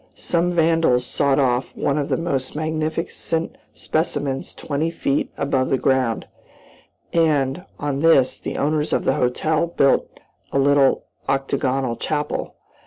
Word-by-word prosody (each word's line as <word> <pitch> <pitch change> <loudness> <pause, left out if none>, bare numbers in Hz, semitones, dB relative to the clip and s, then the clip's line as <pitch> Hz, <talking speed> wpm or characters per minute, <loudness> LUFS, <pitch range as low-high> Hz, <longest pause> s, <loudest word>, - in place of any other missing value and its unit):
Some 175 0 0
vandals 165 -7 +3
sawed 140 +2 +1
off 130 -2 0
one 140 +1 0
of 140 - -2
the - - +1
most 140 -6 -2
magnificent 160 +1 -2 0.2
specimens 145 -4 -2
twenty 155 +2 -2
feet 145 -4 -1
above 135 -2 0
the 135 - +2
ground, 130 -4 +1 0.9
and, 155 0 +1
on 145 -2 -2
this 145 -5 +4
the - - -5
owners 150 +1 0
of - - 0
the - - +3
hotel 155 +6 +1
built 140 -5 +1 0.3
a - - 0
little 140 -1 +3 0.3
octagonal 135 -2 0
chapel. 150 -1 -3
145 Hz, 130 wpm, -22 LUFS, 135-160 Hz, 0.9 s, this